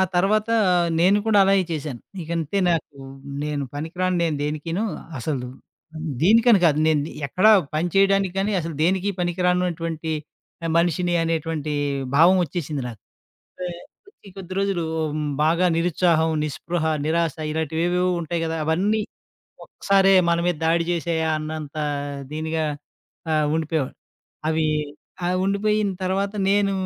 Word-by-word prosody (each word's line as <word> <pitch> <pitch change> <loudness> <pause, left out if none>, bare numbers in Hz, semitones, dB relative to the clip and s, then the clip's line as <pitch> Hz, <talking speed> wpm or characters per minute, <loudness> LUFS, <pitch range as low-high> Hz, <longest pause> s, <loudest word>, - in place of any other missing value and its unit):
ఆ - - +5
తర్వాత 210 +4 +2 0.5
నేను 195 +4 +5
కూడా 215 -2 +4
అలాగే 195 0 +4
చేశాను. 150 -6 -4 0.2
ఇక 160 - -11
అంటే 165 +5 -2
నాకు, 160 -4 -2 0.5
నేను 150 -1 -2
పనికి 160 +4 -6
రాను 185 0 +1
నేను 155 -3 0
దేనికిను, 155 +6 -2 0.4
అసలు 130 -1 -3 0.8
దీనికని 225 +4 +6
కాదు. 150 -2 +2
నేను 155 -2 +3 0.3
ఎక్కడ 185 +9 +1 0.3
పని 165 +3 0
చేయడానికి 195 -1 +3
గానీ, 205 +2 0
అసలు 165 -1 -5
దేనికి 190 +4 +2
పనికిరానటువంటి 175 -2 -1 0.7
మనిషిని 175 +1 +1
అనేటువంటి 160 -2 -2 0.4
భావం 175 +5 +6
ఒచ్చేసింది 155 -3 -4
నాకు. 115 -4 -10 0.6
వె 180 - -2 0.4
కొద్ది 405 - -18
కొద్ది 185 -1 -7
రోజులు 195 -4 0 0.3
ఉమ్ 155 -1 -2 0.2
బాగా 170 +3 +3
నిరుత్సాహం, 165 -1 +2
నిస్పృహ, 160 +3 -3 0.2
నిరాశ, 165 -1 +1 0.2
ఇలాంటివి 160 +1 -1
ఏవేవో 180 +1 +1
ఉంటాయి 170 +1 -3
కదా! 160 0 -2
అవన్నీ 200 +7 +1 0.6
ఒక్కసారే 195 -1 +3
మన 170 0 +3
మీద 175 -3 +1
దాడి 170 +1 +2
చేసేయా 165 -1 -1
అన్నంత 155 -1 -6 0.6
దీనిగా 160 +1 -2 0.7
ఆహ్, 155 -1 +2
ఉండిపోయేవాడు. 160 -3 -1 0.5
అవి 160 0 +1 0.6
ఆహ్, 180 +1 +1
ఉండిపోయిన 205 +1 +1
తర్వాత 195 +2 -1 0.2
నేను 200 0 +2
170 Hz, 130 wpm, -23 LUFS, 155-190 Hz, 0.8 s, దీనికని